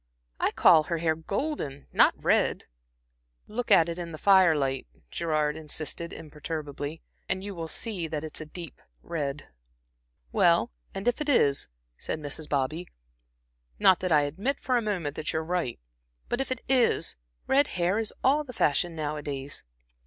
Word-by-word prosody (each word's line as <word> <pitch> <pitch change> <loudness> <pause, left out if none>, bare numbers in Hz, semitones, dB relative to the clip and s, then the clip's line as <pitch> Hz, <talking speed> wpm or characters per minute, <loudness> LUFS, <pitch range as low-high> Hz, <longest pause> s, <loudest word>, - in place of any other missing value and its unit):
I - - +2
call 160 - +6
her 170 - -1
hair 160 -1 +1
golden, 160 - -3
not - - +5
red." - - +2 0.8
"Look 240 +3 -4
at 180 -5 +6
it 170 +1 -4
in 170 -1 -5
the 155 - -7
fire 190 -3 +6
light," 135 - -1 0.2
Gerard 155 -2 0
insisted 160 +2 -5
imperturbably, 150 0 -6 0.3
"and 190 0 -1
you 200 0 -5
will 165 -3 -5
see 185 -1 -2
that 155 -1 -4
it's 155 0 -5
a 155 - -7
deep 170 +1 -9 0.2
red." 145 -3 -3 0.8
"Well, - - +4 0.2
and 195 +4 -4
if 245 +4 +1
it 300 - -1
is," 140 - +3 0.3
said - - -3
Mrs. 150 +1 -5
Bobby 150 +5 -1 0.9
"not 185 - +5
that 185 -1 -2
I 150 -2 +6
admit 195 - -1
for 255 - 0
a 240 - +3
moment 180 -9 -2
that 155 - -2
you - - 0
are - - -8
right 170 -8 -2 0.5
but 240 - 0
if 270 - -3
it 255 - -1
is, 250 - +3 0.3
red 280 +2 +4
hair 180 +4 +2
is 220 -1 -3
all 290 +3 +4
the 255 -3 -10
fashion 165 -2 +1
nowadays." 145 -2 -4
165 Hz, 165 wpm, -28 LUFS, 150-200 Hz, 0.9 s, call